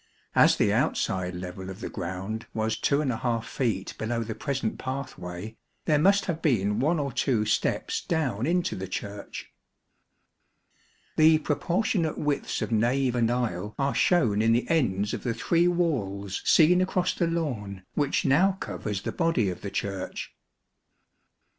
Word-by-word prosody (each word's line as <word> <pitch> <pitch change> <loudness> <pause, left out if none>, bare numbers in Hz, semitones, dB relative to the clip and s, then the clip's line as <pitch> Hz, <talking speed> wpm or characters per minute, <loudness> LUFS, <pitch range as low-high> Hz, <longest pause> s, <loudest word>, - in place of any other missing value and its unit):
As - - +6
the - - +3
outside 90 -1 0
level 90 +1 -6
of 95 +1 -8
the - - -4
ground 95 +4 -5
was 110 0 0
2| 125 -5 0
feet 110 -8 -2
below 115 +1 -1
the 110 0 -4
present 130 -3 -3
pathway, 110 -7 -6 0.3
there 150 -3 +3
must 195 +5 +4
have 165 -3 -3
been 105 -8 +1
one 155 +7 +2
or 140 -2 -2
two 120 -6 +1
steps 105 - 0
down 135 -8 -1
into 175 +1 +1
the 95 +1 -5
Church. 100 +2 -6 1.7
The 155 0 +7
proportionate 170 +2 0
widths 145 -1 -1
of - - -4
nave 120 +4 +2
and 120 -2 +2
aisle 110 -5 -2
are 140 0 0
shown 115 - +3
in 115 +1 +4
the 120 - +1
ends 105 -10 +1
of - - -3
the 115 -3 -2
three 170 +8 +2
walls 105 - -1
seen 180 +3 +5
across 185 -1 +1
the 170 - 0
lawn, 115 - -3
which 145 -2 0
now 180 +8 +4
covers 105 - -5
the - - -2
body 165 - +1
of 90 - -8
the 100 - -4
Church. 100 -2 -4
120 Hz, 150 wpm, -27 LUFS, 100-155 Hz, 1.7 s, The